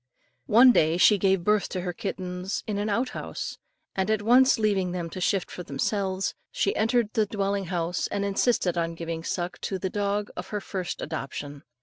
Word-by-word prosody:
One 245 +4 +8
day 160 -6 +3
she 205 +2 +6
gave 190 -2 +2
birth 210 +1 +2
to 185 - -3
her 180 0 -3
kittens 185 0 -4
in 205 -2 -2
an 210 +1 -1
out 240 +5 0
house, - - -6 0.4
and 190 +1 0
at 215 -1 +1
once 255 +4 +6
leaving 200 -5 +1
them 170 -2 -4
to 185 - -6
shift 190 +1 0
for - - -6
themselves, 190 +5 -1 0.2
she 200 - 0
entered 225 0 +1
the 220 -3 +2
dwelling 200 -1 -1
house 175 -1 -1
and 200 - -2
insisted 195 -3 +1
on 165 0 -2
giving 165 -1 -5
suck 175 +1 -3
to 195 - -2
the 185 0 -3
dog 205 0 -1
of - - -6
her 210 - -3
first 185 -3 -4
adoption. 145 -2 -5
195 Hz, 195 wpm, -26 LUFS, 175-210 Hz, 0.4 s, One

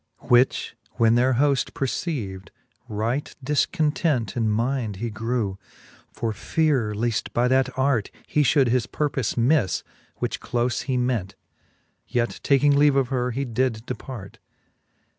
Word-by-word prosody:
Which 125 +2 +3 0.2
when 115 +1 +3
their 125 +2 +3
hoft 140 +1 +1
perceiv'd, 120 - -3 0.4
right 115 +7 -2
difcontent 150 - +1
In 115 -3 +1
mind 115 0 -1
he 115 +4 -4
grew, 110 -3 -2 0.5
for 115 -2 -3
feare 130 -2 0
leaft 115 +1 -1
by 120 +1 +2
that 130 0 +3
art 130 -6 +1 0.2
He 150 - +1
fhould 135 -2 +4
his 120 -1 +1
purpofe 135 -6 -1
mifTe, 120 - +2 0.3
which - - -3
clofe 120 0 -1
he 130 -2 0
ment: 120 -6 -1 0.7
Yet 120 -1 -1
taking 140 0 +4
leave 145 0 +5
of 135 -3 +2
her, 125 -2 0
he 135 +3 -2
did 120 -2 -1
depart. 125 -6 -7
125 Hz, 135 wpm, -24 LUFS, 115-135 Hz, 0.7 s, leave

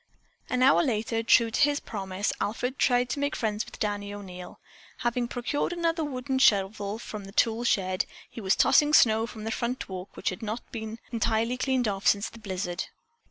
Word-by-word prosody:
An 250 0 +1
hour 270 - +6
later, 225 -5 0
true 230 0 +4
to - - 0
his 290 0 +4
promise, 195 -1 -3
Alfred 245 +5 -2
tried 245 -1 +3
to 285 - -2
make 285 +1 -1
friends 215 -2 -1
with - - -12
Danny 205 -1 -2
O'Neil. 185 -3 -9 0.4
Having 240 0 0
procured 245 +6 -2
another 335 -1 0
wooden 265 -2 -2
shovel 205 -2 +2
from 215 -3 -7
the 195 - -10
tool 225 +2 +2
shed, 185 -5 +1 0.2
he 230 - -9
was 190 -2 +2
tossing 300 0 +5
snow 225 0 +5
from 220 -2 -9
the 225 - -3
front 240 +3 -2
walk 185 0 -8
which - - 0
had 185 +4 -7
not 220 +2 -3
been 220 -1 -5
entirely 230 +1 +1
cleaned 255 -2 0
off 195 -1 -2
since 200 +1 +3
the 230 - -13
blizzard. 185 -3 -3
225 Hz, 190 wpm, -27 LUFS, 205-250 Hz, 0.4 s, hour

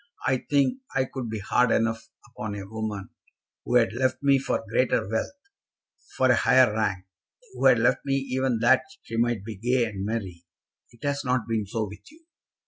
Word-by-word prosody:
I 130 -2 +2
think 145 - +2 0.2
I 135 -1 +2
could 130 -3 -6
be 110 - -3
hard 120 +4 +2
enough 115 0 0 0.2
upon 110 -3 -6
a 100 -1 -7
woman 105 -2 -5 0.5
who - - -1
had 115 -3 +4
left 130 +2 0
me 140 -1 +4
for 130 - -2
greater 120 -2 +1
wealth, 110 - -3 0.8
for 130 -1 +4
a - - +5
higher 125 -1 +4
rank, 105 -4 -1 0.5
who - - +2
had - - +6
left - - +2
me 135 -1 0
even 130 -2 0
that 125 +3 +5 0.2
she 115 - -7
might 115 -4 0
be 110 -3 -7
gay 120 +3 +1
and 100 -4 -5
merry. 100 -6 -4 0.5
It 120 - -20
has 145 0 -1
not 125 -1 +1
been 110 -3 -1
so 110 +2 -2
with 105 - -13
you." 320 +1 -21
115 Hz, 190 wpm, -26 LUFS, 110-130 Hz, 0.8 s, had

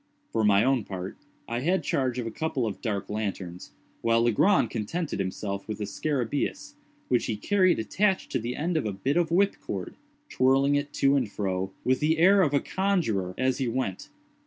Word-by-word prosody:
For 110 - 0
my 105 0 +5
own 130 -2 +2
part, 95 -2 -6 0.3
I 120 +1 -2
had 175 +8 +1
charge 130 -6 0
of 125 - -2
a 115 - -4
couple 135 -1 -2
of 105 - -4
dark 105 -5 -2
lanterns, 95 -4 -4 0.3
while 115 0 +3
Legrand 120 - +3
contented 145 - -3
himself 100 +1 -3
with 110 - -4
the 105 - -4
scarabæus, 145 - -2 0.3
which 125 - +1
he 110 - -2
carried 185 - +3
attached 190 - 0
to - - 0
the 120 +2 -4
end 165 +2 -1
of 145 - -1
a 105 - -2
bit 130 +10 -1
of 170 -2 +2
whip 195 +4 +2
cord; - - -5 0.3
twirling 135 +2 +3
it 145 0 0
to 140 0 +3
and 125 -7 0
fro, 95 -2 -2
with 130 0 +2
the 155 +2 +2
air 190 +4 +6
of 155 -6 +3
a 140 - +3
conjuror, 135 - -1
as 130 +1 +1
he 130 - 0
went. 115 -6 -3
130 Hz, 195 wpm, -27 LUFS, 105-160 Hz, 0.3 s, air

